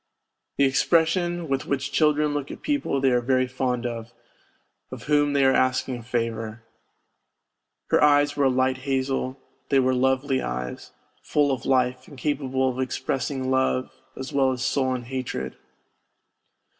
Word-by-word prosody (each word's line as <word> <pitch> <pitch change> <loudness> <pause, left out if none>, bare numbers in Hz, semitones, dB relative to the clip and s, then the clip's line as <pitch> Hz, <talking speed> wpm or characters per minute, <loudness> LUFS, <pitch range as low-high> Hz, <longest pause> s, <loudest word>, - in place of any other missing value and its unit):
The 140 - +4
expression 170 +4 +2
with 135 -1 -2
which 140 -2 -2
children 150 -1 +2
look 145 -1 -3
at - - -9
people 285 - 0
they 135 -1 +3
are 125 0 +2
very 130 +1 +2
fond 125 -1 -2
of, 115 -1 -5 0.8
of - - -8
whom 145 -1 +2
they 140 -1 +3
are 130 - +5
asking 130 0 +1
a - - -9
favour. 115 -1 -3 1.3
Her - - +4
eyes 145 0 +4
were 145 - +2
a - - +5
light 130 0 +1
hazel, 130 0 -2 0.3
they 135 - +4
were 130 0 +2
lovely 130 +1 +1
eyes, 60 +1 -5 0.3
full 145 -1 +1
of 130 - -3
life, 130 -1 +1
and 140 - -13
capable 135 -2 0
of 130 0 -2
expressing 130 0 -2
love 130 -1 +1 0.3
as 130 - -6
well 135 -1 +3
as 130 0 -3
sullen 130 -2 0
hatred. 120 - -4
130 Hz, 155 wpm, -25 LUFS, 130-140 Hz, 1.3 s, are